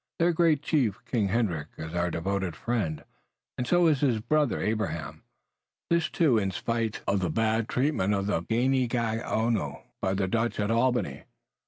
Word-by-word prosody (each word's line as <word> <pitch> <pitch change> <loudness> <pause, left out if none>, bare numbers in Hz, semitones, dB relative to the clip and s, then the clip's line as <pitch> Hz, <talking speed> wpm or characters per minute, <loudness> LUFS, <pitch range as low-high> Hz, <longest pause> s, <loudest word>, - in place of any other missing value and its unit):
Their 170 +1 +3
great 160 -3 +3
chief, 125 - +1
King 110 -5 0
Hendrick, 95 -8 0
is 80 0 -6
our 90 0 0
devoted 95 +1 -2
friend, 100 -11 -2 0.5
and 125 - -3
so 175 +3 +4
is 155 -4 +4
his 125 -6 +2
brother, 150 +4 +1
Abraham. 105 -9 -2 0.7
This, 170 -1 +2
too, 140 -10 +3
in 100 -2 0
spite 115 +5 -2
of 100 0 +1
the 90 -2 -1
bad 110 +5 +1
treatment 125 -7 +1
of 100 0 -1
the 100 -5 0
Ganeagaono 115 -1 0 0.2
by 95 0 0
the 95 -1 0
Dutch 115 +4 -1
at 105 +1 0
Albany. 115 - 0
110 Hz, 160 wpm, -28 LUFS, 95-125 Hz, 0.7 s, so